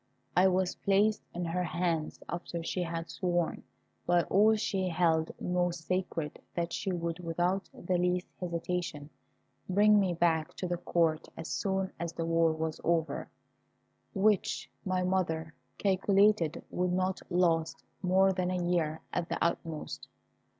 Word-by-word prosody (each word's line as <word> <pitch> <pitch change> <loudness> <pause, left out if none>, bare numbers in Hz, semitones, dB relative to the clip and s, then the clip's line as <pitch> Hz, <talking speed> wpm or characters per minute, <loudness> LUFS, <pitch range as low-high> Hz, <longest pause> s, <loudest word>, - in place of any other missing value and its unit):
I 185 +1 +6
was 185 -1 +1
placed 205 +2 +2
in 175 0 -3
her 175 +2 -1
hands 170 -2 -1
after 170 -1 -4
she 180 - -2
had 165 -1 -3
sworn 175 -2 -1 0.5
by 175 -1 +4
all 215 +3 +4
she 195 -3 -1
held 165 -2 +2
most 175 -2 -1
sacred 180 -5 -2
that 170 -1 -1
she 195 - -2
would, 170 -1 -2
without 175 +3 -1
the 180 0 -1
least 180 0 +1
hesitation, 170 -4 -3 0.6
bring 210 +2 +5
me 185 -3 +1
back 165 -2 +1
to 185 - -3
the 175 0 -1
Court 165 -2 +1
as 160 - -6
soon 190 -1 -1
as 170 0 -3
the 165 -1 -3
war 165 0 +3
was 160 0 -3
over, 165 -1 0 0.9
which 200 0 +1
my 185 -1 0
mother 165 -3 0 0.2
calculated 195 -3 +3
would 180 0 0
not 185 +1 0
last 165 -3 +1 0.2
more 190 +1 +4
than 180 -1 -1
a 180 -1 -1
year 160 -3 0
at 175 -1 -1
the - - -1
utmost. 165 -2 -2
175 Hz, 145 wpm, -31 LUFS, 165-185 Hz, 0.9 s, I